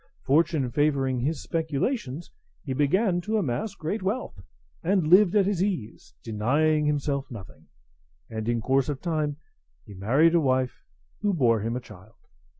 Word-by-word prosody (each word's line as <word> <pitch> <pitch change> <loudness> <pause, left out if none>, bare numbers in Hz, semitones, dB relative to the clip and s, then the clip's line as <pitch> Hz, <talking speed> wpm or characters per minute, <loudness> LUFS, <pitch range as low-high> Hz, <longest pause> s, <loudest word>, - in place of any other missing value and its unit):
Fortune 150 -2 +2
favouring 135 -3 +1
his 145 +3 -2
speculations, 160 - -2 0.3
he 135 - -3
began 175 - +2
to 220 +5 -1
amass 200 - -2
great 190 +5 -3
wealth, 195 - -3 0.4
and 185 -1 +1
lived 185 +4 +5
at 200 -2 +4
his 195 -3 0
ease, 130 - -4
denying 150 +8 +1
himself 145 -2 -1
nothing; 105 -8 -11 0.6
and 110 0 -4
in 120 -1 0
course 135 +3 +1
of 140 -3 -3
time 155 -3 -2 0.5
he 105 - -11
married 135 - +3
a 170 - +4
wife, 130 -2 0 0.4
who 205 -2 0
bore 120 -7 +3
him 115 +3 -2
a - - -2
child. 105 -1 -15
145 Hz, 155 wpm, -26 LUFS, 125-175 Hz, 0.6 s, lived